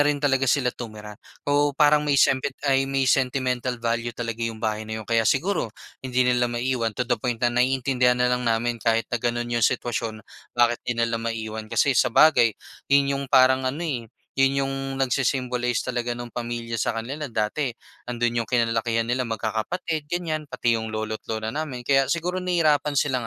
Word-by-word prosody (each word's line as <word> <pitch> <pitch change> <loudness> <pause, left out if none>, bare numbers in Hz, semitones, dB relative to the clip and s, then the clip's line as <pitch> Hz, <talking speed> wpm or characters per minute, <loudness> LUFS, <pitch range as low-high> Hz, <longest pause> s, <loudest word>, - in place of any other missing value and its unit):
rin 145 0 +3
talaga 135 -2 +1
sila 125 -2 +2
tumira. 105 -3 -8 0.3
Oo, 145 0 +2
parang 150 0 +5
may 145 -1 +1
semti 135 +1 +3 0.2
ay, 135 -1 +2 0.2
sentimental 125 -1 +1
value 115 0 -1
talaga 115 -1 -4
yung 115 -1 -2
bahay 110 -1 -3
na 110 - -3
yun. 110 - -7
Kaya 115 0 +2
siguro 165 - +1 0.3
hindi 125 -1 +1
nila 125 -1 +2
maiwan, 120 -2 -1
to 125 - 0
the 120 -2 -1
point 120 -1 -2
na 120 - +3
naiintindihan 125 0 +2
na 125 0 +2
lang 125 -1 0
namin 115 0 0
kahit 115 0 +2
na 120 - 0
gano'n 120 0 -1
yung 120 - +1
sitwasyon, 110 -3 -1 0.3
bakit 120 0 +3
hindi 115 -1 +1
'di 115 - -3
nila 115 - -1
maiwan. 110 -1 -4
Kasi 140 - +2
sabagay, 120 -2 +4 0.3
'yon 140 0 +4
yung 140 0 -2
parang 130 0 +4
ano 155 +6 -4
eh, 120 -8 -3 0.3
'yon 135 0 +2
yung 135 - -3 0.2
nagsi-symbolize 125 -2 0
talaga 120 -1 -2
nung 120 0 -5
pamilya 120 -1 -4
sa - - +1
kanila. 130 +5 -5
Dati 115 +5 -1 0.4
andun 120 -1 0
yung 110 - -11
kinalakihan 115 -1 +1
nila, 125 +2 0
magkakapatid, 125 - -3
ganyan, 160 -3 -2
pati 115 -1 +1
yung 110 0 -3
lolo't 110 0 -4
lola 110 0 -2
namin. 140 -6 -4
Kaya 135 -1 +4
siguro 175 +3 -1
nahihirapan 155 -5 +2
silang 130 -5 0
125 Hz, 180 wpm, -24 LUFS, 115-135 Hz, 0.4 s, parang